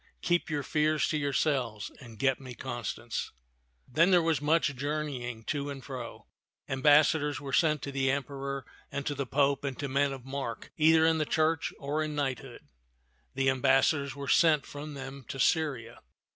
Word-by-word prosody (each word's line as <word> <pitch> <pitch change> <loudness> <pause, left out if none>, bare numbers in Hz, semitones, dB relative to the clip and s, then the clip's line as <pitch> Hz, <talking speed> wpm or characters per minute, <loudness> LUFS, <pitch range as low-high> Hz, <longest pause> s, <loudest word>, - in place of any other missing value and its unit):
Keep 175 0 +1
your 145 -2 -1
fears 155 0 +1
to 155 - 0
yourselves 135 -6 -1
and 115 -4 -12
get 135 +3 +1
me 130 -2 -9
Constance." 120 -1 -4 0.6
Then 165 +8 +3
there 180 -2 +6
was 160 -4 +1
much 150 -1 +2
journeying 135 -5 -3
to 145 +2 -2
and 135 -2 -7
fro. 125 -4 -7 0.4
Am 130 0 -3
bassadors 150 0 +4
were 135 -2 -7
sent 155 -2 +3
to 140 - -4
the 135 -1 +1
Emperor 140 0 -3 0.3
and 140 0 -4
to 145 - -1
the 140 -2 -3
Pope 140 +2 +2
and 135 -3 -3
to 140 - -3
men 140 +1 +1
of 135 -2 -8
mark 135 -4 -5
either 160 0 +5
in 160 0 +3
the - - +2
church 160 +1 +1
or 145 +2 -2
in 155 -1 -3
knight 135 -3 -1
hood; 130 -3 -12 0.7
and 135 0 +1
ambassadors 135 +2 +3
were 140 -1 -6
sent 155 -4 +4
from 145 +1 -8
them 135 0 -8
to 135 - -6
Syria. 135 -7 0
140 Hz, 180 wpm, -30 LUFS, 130-150 Hz, 0.7 s, there